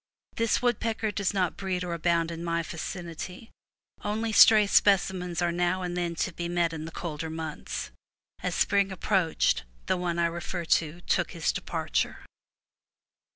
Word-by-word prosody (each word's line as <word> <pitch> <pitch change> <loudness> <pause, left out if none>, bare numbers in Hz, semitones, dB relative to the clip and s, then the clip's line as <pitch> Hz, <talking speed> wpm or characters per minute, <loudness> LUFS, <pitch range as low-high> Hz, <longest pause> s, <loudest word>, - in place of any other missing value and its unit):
This 230 +1 +1
woodpecker 225 -2 0
does 200 -2 0
not 185 -4 0
breed 185 -2 -2
or 175 -1 -3
abound 170 0 +1
in 165 0 -6
my 170 0 0
vicinity; 175 +4 -6 0.5
only 220 +2 -1
stray 215 0 +8
specimens 185 -3 +2
are 170 - +2
now 175 +2 0
and 175 -1 -3
then 175 -1 -1
to 185 - -7
be 170 0 -4
met 170 -1 +1
in 160 -1 -5
the 165 - -7
colder 160 -2 -5
months. 160 - -5 0.5
As - - -2
spring 200 -1 +2
approached, 185 - +1 0.2
the - - +1
one 175 -1 -2
I 170 - +3
refer 170 +1 -3
to 165 +1 +1
took - - 0
his - - 0
departure. - - -2
175 Hz, 155 wpm, -28 LUFS, 170-195 Hz, 0.5 s, stray